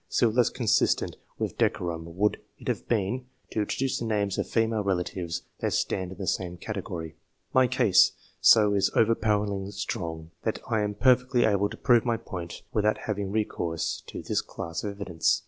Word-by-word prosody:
Still 115 -3 +3
less 120 +1 +3
consistent 115 -5 +1 0.2
with - - -3
decorum 85 -1 -1
would 105 +2 +2 0.2
it - - -12
have - - -2
been, 120 +3 0 0.2
to - - -2
intro 105 - -1
duce 135 0 0
the 115 - -3
names 105 -3 0
of - - -2
female 110 -2 +1
relatives 90 -3 -2 0.2
that - - -1
stand 95 -1 -1
in 95 - -9
the 95 - -4
same 90 -1 -2
category. 85 -5 -5 0.4
My 130 -1 +5
case 115 -6 +5
is - - -13 0.3
so 105 -2 +6 0.2
overpoweringly 105 -3 +2
strong, 85 -5 -4
that - - -1
I 110 - +1
am 105 0 -1
perfectly 125 +1 +4
able 100 -1 +2
to 110 - -9
prove 120 -3 +4
my 120 -2 +1
point 85 -5 -7
without 105 0 +2
having 100 -2 -2
recourse 90 -6 -2
to - - -7
this - - 0
class 85 0 -6
of 105 -1 -3
evidence. 90 -5 +1
105 Hz, 180 wpm, -27 LUFS, 90-115 Hz, 0.4 s, so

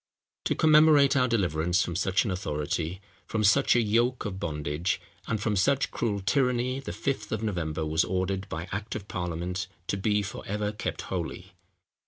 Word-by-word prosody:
To - - +1
commemorate 150 -3 +6
our 130 -2 +4
deliverance 90 -5 +1
from 85 - -4
such 95 +4 +1
an 105 - -1
authority—from 90 +5 -3
such 115 +8 +5
a 120 - +5
yoke 120 +4 +1
of 95 -2 -4
bondage—and 80 +5 -3
from 105 0 0
such 135 +9 +2
cruel 105 -4 -1
tyranny, 125 +5 +1
the 135 - -6
Fifth 135 -1 -3
of 110 0 -2
November 80 -7 -2
was 80 +1 +2
ordered 95 +1 -2
by 85 +2 -4
act 105 +3 -4
of 100 -2 -6
parliament 90 +1 -3 0.2
to 100 - -1
be 105 +1 +1
for 95 - -6
ever 105 +1 -1
kept 105 - -4
holy. - - -5
100 Hz, 165 wpm, -28 LUFS, 90-115 Hz, 0.2 s, commemorate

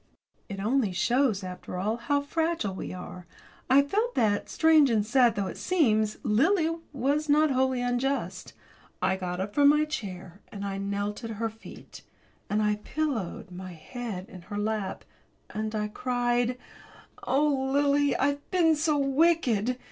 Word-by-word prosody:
It 195 -1 -5
only 220 +1 +1
shows, 235 0 +1
after 180 0 -7
all, 210 +5 -1
how 285 +4 0
fragile 320 - -1
we 190 - -6
are. 180 -1 -9 0.4
I 275 +2 +6
felt 430 +11 -1
that, 205 -3 +1
strange 315 -4 +5
and 215 -3 +2
sad 240 +1 +4
though 200 -1 -1
it 185 - -6
seems, 220 -12 +2
Lily 325 - +2 0.2
was 290 +3 0
not 300 +1 +4
wholly 260 -1 +1
unjust. 245 +3 -2 0.5
I 190 - +1
got 180 -1 -4
up 200 +2 -3
from 285 -1 +6
my 300 +1 +4
chair, 190 - -6
and 200 -1 -6
I 195 0 -3
knelt 200 +2 -3
at 230 - -4
her 225 +1 -2
feet, 225 - -13 0.5
and 215 +1 +1
I 210 0 +1
pillowed 220 - -3
my 185 0 -8
head 195 +2 -7
in 185 - -11
her 205 +4 -7
lap 210 -2 -2 0.5
and 215 +1 -3
I 210 0 -1
cried: 245 +1 0 0.6
"Oh, 275 -1 +1
Lily, 285 0 +3
I've 285 +1 -1
been 330 -3 +3
so 305 0 +1
wicked! 275 -5 +2
240 Hz, 155 wpm, -27 LUFS, 205-285 Hz, 0.6 s, I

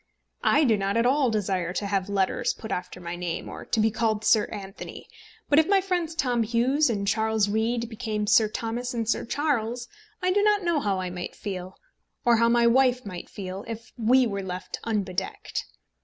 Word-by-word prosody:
I 295 - +4
do 225 -6 +4
not 195 +2 0
at 230 - +3
all 265 0 +3
desire 190 -5 -1
to 200 - -2
have 195 -1 -1
letters 195 -2 +1
put 220 - -8
after 180 0 -4
my 175 -1 -5
name, 175 -1 -4
or - - -8
to 225 - 0
be 220 +1 +3
called 220 -1 0
Sir 215 -2 +5
Anthony, 195 -2 -8 0.4
but 290 - +5
if 320 - +3
my 395 -1 +5
friends 355 -4 -1
Tom 250 -6 +1
Hughes 245 +6 +2
and 200 -3 -1
Charles 220 0 +2
Reade 230 +3 0
became 220 -2 -3
Sir 215 +1 +5
Thomas 235 +3 -3
and 230 -2 -2
Sir 230 - 0
Charles, 245 -3 -1 0.3
I 365 0 +1
do 405 +2 +3
not 415 -1 +3
know 340 -3 +2
how 200 -7 0
I 185 -1 -3
might 180 0 -6
feel, 185 -2 -6 0.5
or 240 -1 +5
how 230 +1 +4
my 235 0 +4
wife 250 0 +3
might 180 -3 -7
feel, 190 0 -6
if 230 0 -7
we 245 +2 +4
were 200 -3 -2
left 185 -1 -5
unbedecked. 195 -4 -3
220 Hz, 200 wpm, -26 LUFS, 200-245 Hz, 0.5 s, Sir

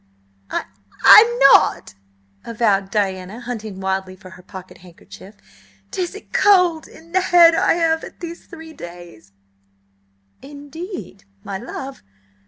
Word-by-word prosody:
"I–I'm 425 +2 +4
n 475 +1 -5
not!" - - +2 0.5
avowed 205 -4 0
Diana, 190 +1 -3
hunting 220 -5 -7
wildly 190 -1 -3
for 185 -1 -15
her 185 - -14
pocket 185 0 -12
handkerchief. 185 +3 -15 0.6
"'Tis 365 0 -4
a 410 - -9
cold 360 -5 +2
in 330 +1 -18
the 375 +1 +1
head 340 -2 +5
I - - +2
have 325 -1 0
had - - -12
these 340 -1 -9
three 320 -1 -12
days." 170 - -13 1.1
"Indeed, 290 - -10 0.2
my 195 -2 -6
love? 265 +4 -8
235 Hz, 125 wpm, -19 LUFS, -, 1.1 s, head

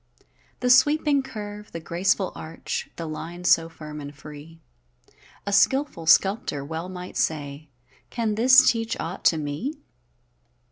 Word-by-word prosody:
The 250 0 +3
sweeping 290 +2 +4
curve, 210 -4 -8
the 165 - -4
graceful 180 +3 0
arch, 160 +1 -6
The 165 - -5
line 165 +3 -7
so 165 -2 +4
firm 150 -2 -9
and 145 0 -9
free; 150 +3 -12 0.9
A 200 - -2
skilful 235 - +2
sculptor 180 -6 +3
well 165 +4 -5
might 180 -1 -8
say: 145 -1 -2 0.4
"Can 225 -3 -1
this 255 +4 +6
teach 230 +1 0
aught 170 +3 -5
to 165 - +5
me?" 155 - -4
180 Hz, 135 wpm, -24 LUFS, 155-225 Hz, 0.9 s, this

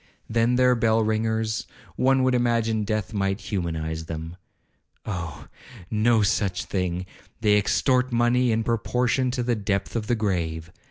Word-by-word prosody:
Then 115 +2 +2
their 125 0 +4
bell 115 -1 +2
ringers—one 110 +4 0
would 130 0 +3
imagine 115 -3 +1
death 110 0 -2
might 95 -1 0
humanize 80 -6 -3
them. 80 +1 -6 0.7
Oh! 85 -6 -5 0.4
no 110 0 +3
such 100 -3 0
thing—they 95 +3 -2
extort 125 +5 +2
money 120 +1 +2
in 115 0 +1
proportion 125 +3 0
to 125 0 -2
the 120 0 +1
depth 100 -2 -2
of 110 -2 -2
the 120 - +2
grave. 85 -6 -2
110 Hz, 130 wpm, -25 LUFS, 95-120 Hz, 0.7 s, their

